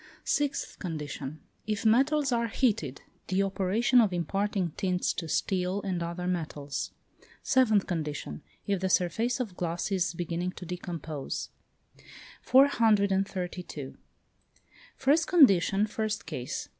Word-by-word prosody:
Sixth 285 -1 -1
condition. 150 -4 -5 0.3
If 215 0 -2
metals 275 +5 +3
are 235 -1 +1
heated; 215 - 0 0.2
the 190 +1 +2
operation 200 +6 +3
of 215 -4 +2
imparting 185 +1 -1
tints 180 +2 0
to 165 -3 -5
steel 185 +2 0
and 185 -3 -2
other 170 +1 -4
metals. 150 -6 -3 0.5
Seventh 220 -7 +3
condition. 155 -4 -4 0.2
If 200 -2 0
the 190 +1 -1
surface 220 - +1
of 220 -8 -3
glass 175 +3 -2
is 185 -2 0
beginning 175 +1 -2
to 180 - -9
decompose. 165 -5 -5 0.9
432. 195 - +2 1.0
First 300 +5 +3
condition, 205 - +5
first 215 0 -3
case. 140 -6 -4
190 Hz, 115 wpm, -29 LUFS, 170-220 Hz, 1.0 s, condition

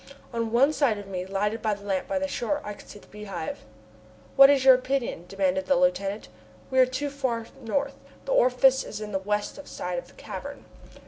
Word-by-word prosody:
On 230 -1 -2
one 270 +6 +4
side 265 -9 +2
of 205 - -8
me, 185 -1 -5
lighted 205 +3 -1
by 215 -2 0
the 200 0 -14
lamp 195 -2 -1
by 290 - -1
the 285 0 -1
shore, 285 +2 -2
I 210 - -5
could - - -15
see - - -10
the - - -16
Beehive. 200 -6 -7 0.7
"What 275 0 +9
is 275 -2 +3
your 265 - +10
opinion?" 255 -8 -1
demanded 190 -1 0
the 275 - +4
lieutenant. 260 -7 0 0.4
"We 260 - +2
are 255 - +7
too 270 +3 -3
far 250 -5 -2 0.2
north. 275 +4 -2 0.3
The - - -4
orifice 265 - +4
is 210 - -7
in 210 -1 -6
the 190 - -1
west 210 +8 -3
side - - -4
of - - -12
the - - -20
cavern." - - -8
235 Hz, 210 wpm, -26 LUFS, 205-275 Hz, 0.7 s, your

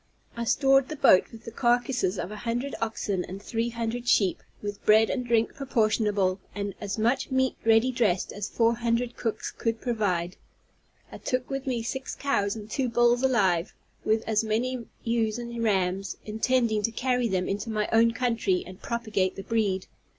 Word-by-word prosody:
I 235 0 -3
stored 270 +2 +3
the 310 - -4
boat 185 -9 +6
with 225 -2 -13
the 230 - -6
carcases 240 -5 +1
of 180 - -4
an 210 - -6
hundred 240 +4 -2
oxen, 205 -4 -1
and 190 +2 -7
three 230 +3 -2
hundred 235 +1 -4
sheep, 195 -6 +3 0.2
with 205 -1 -6
bread 220 +1 +5
and 250 - -1
drink 230 -2 +1
proportionable, 215 -7 +1 0.2
and 200 -1 -3
as 205 0 -3
much 235 +5 +1
meat 260 0 +1
ready 225 +3 +4
dressed 210 -7 0
as 205 -1 -4
four 230 0 +2
hundred 235 +1 0
cooks 225 -3 -3
could 230 -1 -2
provide. 190 -8 -1 0.7
I - - -9
took 255 0 -2
with 270 0 -3
me 240 -3 -1
six 265 +4 -4
cows 205 -8 0
and 210 -2 -8
two 255 +3 -1
bulls 240 +1 +3
alive, 200 -9 +2 0.3
with 220 +1 +1
as 220 0 +2
many 235 +2 -1 0.2
ewes 230 -1 0
and 235 -1 -5
rams, 195 -2 0
intending 220 0 +1
to 230 - 0
carry 245 0 0
them 185 -3 -1
into 205 +3 -3
my 215 -1 0
own 230 +1 +5
country 230 -6 0
and 185 +2 -11
propagate 215 -6 -1
the 195 - -7
breed. 200 -4 0
225 Hz, 180 wpm, -27 LUFS, 205-240 Hz, 0.7 s, boat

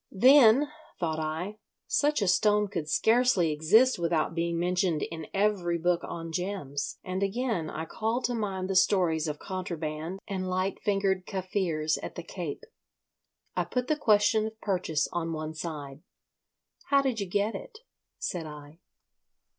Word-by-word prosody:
Then, 260 +5 +6 0.3
thought 160 -2 -1
I, 165 +7 -4 0.3
such 295 -5 +2
a - - 0
stone 210 +2 +3
could 155 -5 -4
scarcely 225 -8 +3
exist 200 +12 +4
without 165 -1 0
being 170 0 -1
mentioned 180 -2 +1
in 160 -2 -6
every 195 -4 +1
book 175 +1 +1
on 165 -1 -6
gems, 165 -6 -3
and 185 +1 -3
again 200 -5 -1
I 160 - -4
called 225 +8 -2
to 245 - 0
mind 195 -5 -2
the 195 - -1
stories 175 -5 +3
of 150 -1 -3
contraband 170 -2 -4
and 185 -2 -3
light 185 +1 -1
fingered 195 -2 0
Kaffirs 180 -5 -1
at - - -7
the - - -6
Cape. - - -6 0.9
I - - +1
put 250 -1 -2
the 305 - +3
question 215 -4 +3
of 220 0 -10
purchase 175 -7 0
on 165 -1 -2
one 155 0 -4
side. 150 -3 -6 0.8
"How 280 -1 +3
did 255 -5 0
you 200 - -2
get 205 +4 0
it?" - - -8 0.4
said 170 -3 -3
I. 150 +1 -11
185 Hz, 155 wpm, -28 LUFS, 160-210 Hz, 0.9 s, Then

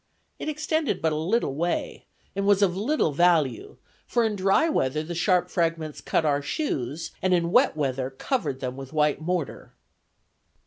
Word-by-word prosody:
It - - -3
extended 310 -1 -1
but 160 -1 +1
a - - -1
little 165 - 0
way, 170 +5 -2 0.3
and 200 0 -1
was 205 0 +4
of 180 -3 +2
little 220 - +1
value, 150 -7 +2 0.3
for 240 - +1
in 215 -1 0
dry 195 - +3
weather 155 - 0
the 170 +2 -6
sharp 180 +1 +2
fragments 165 -3 -2
cut 160 - 0
our 145 -1 +2
shoes, 145 - -3
and 185 -1 +3
in 170 -1 0
wet - - +4
weather 135 -3 -1
covered 135 - -2
them 130 -1 -3
with 135 +1 -9
white 150 -1 +2
mortar." 175 -2 -3
170 Hz, 170 wpm, -25 LUFS, 145-200 Hz, 0.3 s, was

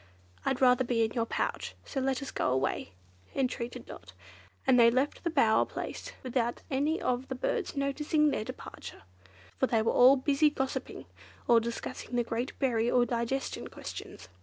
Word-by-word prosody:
"I'd 265 -1 -1
rather 250 0 +5
be 235 -2 +2
in 220 - -4
your 230 -1 -1
pouch, - - -2
so 275 - -3
let 265 +1 0
us 275 - -6
go - - 0
away," 130 -6 -1 0.4
entreated 250 -2 -2
Dot; 95 +1 -11 0.5
and 250 - +5
they 230 -1 +8
left 260 +4 0
the 340 - +1
bower 230 -9 +4
place - - -6
without 240 -2 -1
any 290 +5 +1
of 250 +1 -1
the 260 - -4
birds 335 - -2
noticing 295 +2 +2
their 215 - -1
departure, - - -9 0.6
for 260 - +3
they 225 -3 +2
were - - +2
all 255 +2 +8
busy 280 +3 +3
gossiping, 265 -2 -4 0.4
or 235 -1 +6
discussing 235 +1 -5
the 240 - +2
great 235 +3 -3
berry 235 -4 +1
or 245 -1 +4
digestion 240 +3 -2
questions. - - -8
255 Hz, 170 wpm, -30 LUFS, 235-275 Hz, 0.6 s, they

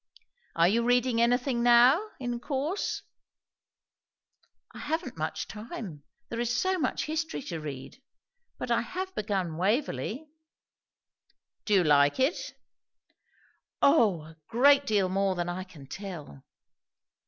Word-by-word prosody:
"Are 170 +1 +5
you 225 +5 +2
reading 245 -1 +2
anything 245 +1 +2
now, 245 +7 +6 0.2
in 245 -2 -3
course?" 290 +9 -2 1.7
"I - - -10
haven't 305 -4 -3
much 155 0 -3
time, 210 - -8 0.3
there 230 - -4
is 240 0 0
so 375 +5 +1
much 260 - -1
history 320 -1 -3
to 170 - -5
read. 145 - -8 0.6
But - - -4
I - - +3
have 375 +1 -5
begun 195 - -2
'Waverley.'" 215 - -1 1.4
"Do 210 - +2
you 185 - +5
like 145 - +4
it?" 270 +7 0 1.3
"O, 225 - +4
a 160 +1 -14
great 280 +4 +4
deal 205 -3 +2
more 195 0 0
than 175 0 -2
I 180 +1 -4
can 170 -7 -14
tell!" 160 - -8
230 Hz, 125 wpm, -28 LUFS, 175-265 Hz, 1.7 s, now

